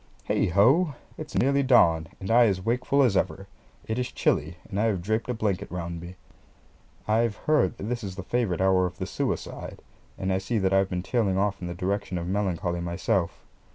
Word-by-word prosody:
Heigh - - +2
ho! 130 - +4 0.2
it's 155 -1 -8
nearly 140 +2 +3
dawn, 85 -12 +4
and 95 +2 -4
I 120 0 +6
as 95 -3 0
wakeful 125 +4 +2
as 120 -6 +2
ever. 95 +1 -1 0.4
It 110 +2 -2
is 125 - -2
chilly, 90 - 0
and 100 -1 -3
I 110 - +2
have 100 -6 0
draped 110 +5 -1
a - - +1
blanket 105 -5 -1
round 85 -1 -5
me. 90 +2 -9 0.9
I've 110 0 +2
heard 150 -9 +1
that - - -8
this 120 +2 -3
is 95 -2 -5
the 95 - -6
favourite 100 -5 -1
hour 95 -1 +3
of 90 0 -10
the - - -3
suicide, - - -4 0.4
and 95 0 -1
I 95 - +1
see 95 +5 -2
that 95 -2 +1
I've 95 0 +3
been 90 -1 -3
tailing 100 -4 0
off 100 0 0
in 90 - -4
the 85 - -5
direction 95 +1 -2
of 85 - -3
melancholy 90 -3 -1
myself. 85 0 -1
95 Hz, 205 wpm, -26 LUFS, 90-115 Hz, 0.9 s, I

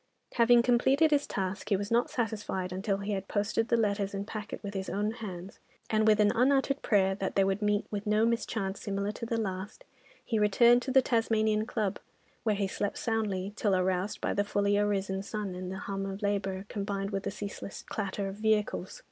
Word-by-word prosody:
Having 235 0 +5
completed 265 +6 +4
his 290 -1 +2
task, 195 +1 -3
he 205 - +4
was 200 +3 -5
not 235 +1 +3
satisfied 210 -6 -2
until 195 +1 -1
he 200 +1 -4
had 195 -1 -3
posted 220 +2 0
the 235 - +2
letters 200 -2 0
and 195 +1 -3
packet 210 -1 -6
with 200 0 -5
his 190 -1 -3
own 210 +2 0
hands, 195 -5 -8 0.3
and 215 0 +3
with 215 0 +5
an 210 0 +5
unuttered 270 +3 +2
prayer 195 -3 +3
that 190 -1 -3
they 195 - +4
would 195 +2 0
meet 210 0 +1
with 210 0 -4
no 210 +1 +3
mischance 225 -4 -1
similar 200 0 -2
to 230 +2 -6
the 230 0 -1
last, 195 - -4 0.4
he 225 -3 0
returned 235 +4 +5
to 260 - -5
the 265 0 +5
Tasmanian 220 -2 +1
Club, 215 -5 -1 0.4
where 215 -2 +1
he 200 0 0
slept 200 +1 -3
soundly 205 -4 -1
till 205 -2 +1
aroused 185 +2 0
by - - 0
the 205 - +1
fully 205 0 +1
arisen 200 -2 0
sun 205 -1 -4
and 180 0 -5
the 190 - -5
hum 195 0 -4
of 195 +2 -6
labour, 195 -1 -1
combined 200 -1 -3
with 195 -1 -1
the - - -3
ceaseless 200 0 -7
clatter 200 -1 -3
of 195 +1 -6
vehicles. 215 -3 0
205 Hz, 205 wpm, -30 LUFS, 195-220 Hz, 0.4 s, Having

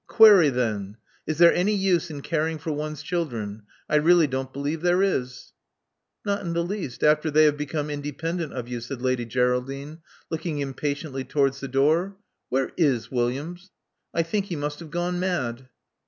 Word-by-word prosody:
Query 205 -9 +8
then: 110 -5 -2 0.3
is 155 0 -1
there 170 0 +7
any 200 +4 +2
use 185 -3 +1
in 145 -2 -6
caring 160 +1 -1
for 155 +1 -4
one's 150 0 -4
children? 120 - -3 0.3
I 150 - +3
really 165 +2 +5
don't 130 -1 -3
believe 145 +4 -3
there 180 +2 +3
is." 125 -9 -2 0.7
"Not 200 0 -1
the 170 -1 -1
least, 175 -8 -5
after 150 +1 +4
they 155 +1 +5
have 150 -1 +4
become 150 0 -3
independent 150 +3 -3
of 125 -2 -5
you," 120 -1 -4
said 125 +2 -6
Lady 130 -2 0
Geraldine, 130 +5 -1 0.3
looking 160 -1 -3
impatiently 140 0 -3
towards 140 -1 +1
the 135 - -5
door. 155 +9 +2 0.3
''Where 130 +1 0
is 140 -9 +1
Williams? 140 +10 -2 0.4
I 165 - +1
think 195 +4 -1
he 180 - -4
must 145 0 -4
have 165 -2 -9
gone 175 +2 -2
mad." 130 -9 -2
150 Hz, 170 wpm, -25 LUFS, 130-170 Hz, 0.7 s, Query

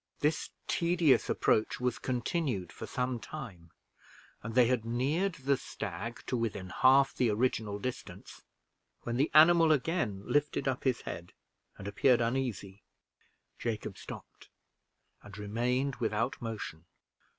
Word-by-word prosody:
This 150 +1 +1 0.2
tedious 170 -4 +3
approach 110 - +1
was 125 -1 -1
continued 125 - -2
for 110 - -7
some 125 +2 -2
time, 105 - -9 0.7
and 110 +1 -6
they 125 -1 +7
had 125 -2 +1
neared 145 +11 0
the 135 0 +1
stag 115 -1 -6
to - - -1
within 100 -6 -3
half 135 +4 +5
the 125 - +1
original 110 -2 0
distance, 125 +4 -7 0.6
when 120 0 -2
the 140 +4 +2
animal 165 +1 +7
again 140 - 0
lifted 145 +2 0
up 130 0 -1
his 130 -3 +1
head 85 +1 -7 0.4
and 100 - -8
appeared 120 +5 +3
uneasy. 115 -5 -2 0.8
Jacob 115 -3 -3
stopped - - -11 0.7
and 100 0 -12
remained 125 +6 -1
without 115 +6 -1
motion. 105 -8 -6
125 Hz, 130 wpm, -31 LUFS, 110-135 Hz, 0.8 s, they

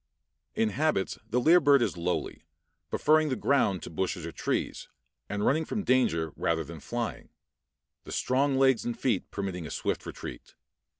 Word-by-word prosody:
In 110 - +2
habits 145 -5 0
the 120 +3 +2
lyre 165 +7 +6
bird 140 -4 +5
is - - -1
lowly, 90 +1 -2 0.5
preferring 155 0 +3
the 130 - 0
ground 115 -10 +1
to - - -7
bushes 90 0 -2
or 85 - -5
trees, - - -2 0.4
and 105 0 -1
running 155 +4 +3
from 205 +6 -3
danger 85 - +2
rather 80 -1 0
than 80 +2 -9
flying, 120 +9 -4 0.8
the - - -9
strong 135 +1 +1
legs 130 -3 +4
and 120 - -3
feet 115 -8 0
permitting 95 -5 -4
a - - -8
swift - - -2
retreat. - - -8
120 Hz, 165 wpm, -29 LUFS, 90-140 Hz, 0.8 s, lyre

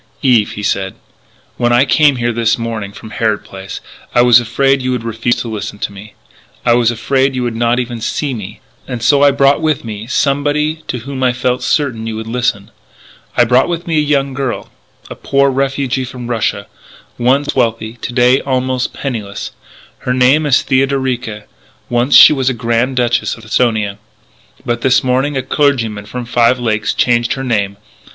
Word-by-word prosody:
"Eve," 120 -6 +3
he 105 - -6
said, 95 -1 -1 0.6
"when 120 -1 +1
I 120 +3 +4
came 145 -1 +4
over - - -6
here 120 0 0
this 115 0 +1
morning 115 -4 -4
from 110 +1 -11
Harrod 110 -1 -1
Place 95 0 -9 0.3
I 120 - +6
was 120 -1 +7
afraid 135 +3 +1
you 130 - -2
would 125 -2 -3
refuse 115 +1 -1
to - - -5
listen 105 -2 -5
to 105 - -4
me; 100 +2 -12 0.5
I 120 - +4
was 120 -1 +3
afraid 130 +3 0
you 125 - -1
would 120 -2 -2
not 120 +1 +1
even 120 -2 -3
see 140 +4 -2
me. 105 -6 -8 0.3
And 120 -2 -5
so 140 +3 +4
I 145 - +7
brought 140 +1 +3
with 155 -6 0
me 110 0 -6
somebody 145 +4 0
to - - -3
whom 135 +1 -6
I 125 -1 +2
felt 125 0 -1
certain 120 -7 -1
you 110 - -4
would 110 0 -5
listen.... 115 -3 -2 0.7
I 120 - +6
brought 125 +6 +3
with 170 -1 -3
me 165 -2 -1
a - - +4
young 140 -2 0
girl 135 -2 -4 0.4
a - - -7
poor 140 0 +1
refugee 135 -1 -1
from 125 -1 -8
Russia, 110 -4 -1 0.5
once 135 +4 +1
wealthy, 115 -3 0
to - - -4
day 125 +1 +3
almost 130 -1 -1
penniless.... 110 -7 -5 0.5
Her 125 - -2
name 135 +5 +3
is 140 - +3
Theodorica.... 130 -5 -1 0.5
Once 120 +3 +2
she - - +9
was 135 -2 0
Grand 120 +2 0
Duchess 120 -1 0
of 115 - -14
Esthonia.... 110 -3 0 0.7
But 120 0 -2
this 130 0 +3
morning 130 +3 0
a 130 - -2
clergyman 120 -8 0
from 125 +1 -6
Five 120 +1 +2
Lakes 110 -3 0
changed 120 -1 +1
her 135 - -5
name.... 100 -5 -1
125 Hz, 185 wpm, -15 LUFS, 115-135 Hz, 0.7 s, she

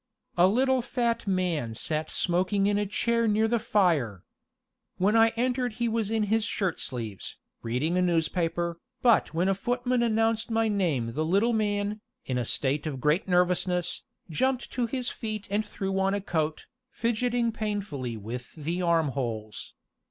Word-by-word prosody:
A 175 +1 +6
little 260 +5 +3
fat 235 -2 -1
man 175 - 0
sat 155 +4 -2
smoking 185 +3 +1
in 205 0 +2
a 205 - -1
chair 230 +3 +1
near 215 +1 +3
the 235 +1 +1
fire. 165 - +1 0.7
When 200 +4 +2
I 225 0 +7
entered 250 0 0
he 235 +2 -1
was 225 -2 0
in 220 -1 +1
his 220 +2 +1
shirt 195 -5 -1
sleeves, 115 -6 -4 0.2
reading 145 +10 0
a - - +3
newspaper, 170 0 0 0.2
but 235 -3 +4
when 175 +3 +2
a 195 - +3
footman 245 +4 0
announced 225 -1 +1
my 225 0 +2
name 160 - 0
the 155 +5 0
little 200 +9 +2
man, 205 -1 0 0.2
in 125 -1 -1
a 120 - -1
state 140 +6 0
of 140 -4 -4
great 150 +9 +1
nervousness, 180 -1 +2 0.3
jumped 250 - 0
to 245 -2 0
his 250 +1 -2
feet 215 -2 -5
and 210 +2 +1
threw 195 -2 -3
on 195 +1 +2
a - - 0
coat, 160 -4 -2 0.2
fidgeting 235 0 0
painfully 200 - -3
with 120 +4 -7
the 165 +4 -3
armholes. 135 -11 -1
195 Hz, 160 wpm, -27 LUFS, 160-225 Hz, 0.7 s, I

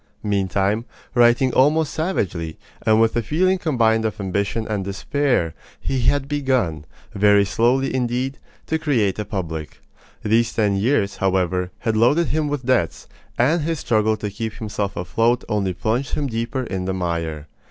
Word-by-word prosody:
Meantime, 100 +1 0 0.3
writing 120 +1 +4
almost 150 +3 +3
savagely, 95 - -2 0.3
and 110 0 +4
with 115 0 +3
a 120 - +2
feeling 185 - +1
combined 115 -9 +2
of 110 -1 -2
ambition 100 +3 -2
and 105 -3 -2
despair, 100 - 0 0.3
he 135 - -2
had 140 +3 +1
begun, 130 - 0 0.3
very 100 0 +4
slowly 125 +6 +1
indeed, 130 +2 -1 0.3
to 160 - -1
create 115 - +1
a 105 - -2
public. 80 -7 -5 0.4
These 115 +2 +2
ten 105 -3 +1
years, 100 -1 +1
however, 90 -1 0
had 110 -1 0
loaded 135 +10 +3
him 155 -1 0
with 145 -3 -3
debts; 125 -10 +1 0.3
and 155 +8 +3
his 165 +2 -1
struggle 110 -5 +1
to 105 -1 -4
keep 110 +2 -4
himself 105 -2 -4
afloat 115 +7 +1
only 105 -4 0
plunged 115 +9 -1
him 145 - -1
deeper 115 +1 -2
in 95 -6 -4
the 95 0 -2
mire. 85 -4 -3
110 Hz, 155 wpm, -21 LUFS, 100-130 Hz, 0.4 s, writing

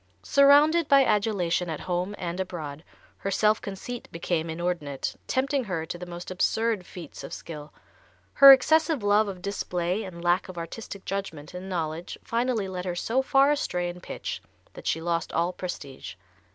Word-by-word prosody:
Surrounded 290 +3 +5
by 275 -1 +6
adulation 200 -6 +1
at 155 - -4
home 180 +3 -2
and 175 0 -4
abroad, 160 -5 -5 0.3
her 195 - -3
self 215 +2 +2
conceit 220 +5 -6
became 170 -1 -2
inordinate, 160 -4 -3
tempting 270 0 0
her 175 -5 -3
to 175 - -5
the 180 +1 -8
most 175 +1 -7
absurd 215 +1 0
feats 170 -5 -9
of - - -8
skill. 150 -2 -8 0.6
Her 275 0 +11
excessive 310 0 +4
love 205 +1 +4
of 185 -3 -7
display 180 0 -2
and 175 -3 -8
lack 175 +3 +2
of 185 - -9
artistic 190 +4 -7
judgment 180 -7 -5
and 185 +2 -7
knowledge 165 -2 -3
finally 230 -3 0
led 185 -1 -5
her 180 -1 -2
so 230 +8 +1
far 270 +1 +4
astray 180 -11 -1
in 175 0 -8
pitch - - -5 0.3
that - - -9
she 160 - +1
lost 170 0 -1
all 170 +2 +1
prestige. 140 - -7
185 Hz, 165 wpm, -27 LUFS, 170-225 Hz, 0.6 s, Her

